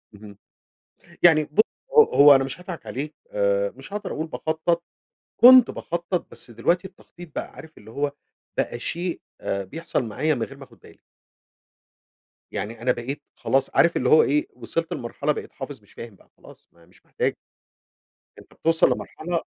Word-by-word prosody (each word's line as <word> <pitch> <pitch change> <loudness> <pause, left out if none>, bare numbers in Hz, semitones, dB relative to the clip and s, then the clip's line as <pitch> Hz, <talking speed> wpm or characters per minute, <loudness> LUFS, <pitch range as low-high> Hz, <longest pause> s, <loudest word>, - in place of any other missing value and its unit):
اهم، 100 -1 -13 0.9
يعني 160 -3 +7
ب 150 +7 +1 0.4
هو 450 - +11
هو 145 - +7
أنا 135 0 +3
مش 135 +6 -6
هاضحك 180 -2 -8
عليك، 150 +4 -5 0.2
آآ، - - +1
مش 350 - -14
هاقدر 210 0 -4
أقول 155 - -3
باخطط، 160 +1 -1 0.5
كنت 250 +1 +9
باخطط، 175 +1 -3
بس - - -7
دلوقتي 170 - 0
التخطيط 175 -3 -15
بقى - - -4
عارف 160 0 -13
اللي 110 - -14
هو 140 +4 -2 0.5
بقى 120 - -1
شيء 170 +7 -3 0.2
آآ، 100 0 -2
بيحصل 160 - -3
معايا 150 +8 0
من 120 - -4
غير 135 +4 -5
ما 135 - -10
آخد - - -21
بالي. - - -17 1.5
يعني 115 +3 -5
أنا 125 +1 +2
بقيت 125 +4 -4
خلاص 135 0 0
عارف 170 - +4
اللي 125 - +1
هو 155 - +7
إيه؟ 150 +2 +1
وصلت 160 +7 -3
لمرحلة 120 - -2
بقيت - - -5
حافظ - - -8
مش - - -23
فاهم 115 -4 -10
بقى - - -25
خلاص - - -17
ما 85 - -25
هي - - -20
مش 90 - -25
محتاجة. - - -1 1.0
أنت - - -18
بتوصل 165 0 +2
لمرحلة 170 +1 -3
155 Hz, 170 wpm, -24 LUFS, 125-175 Hz, 1.5 s, هو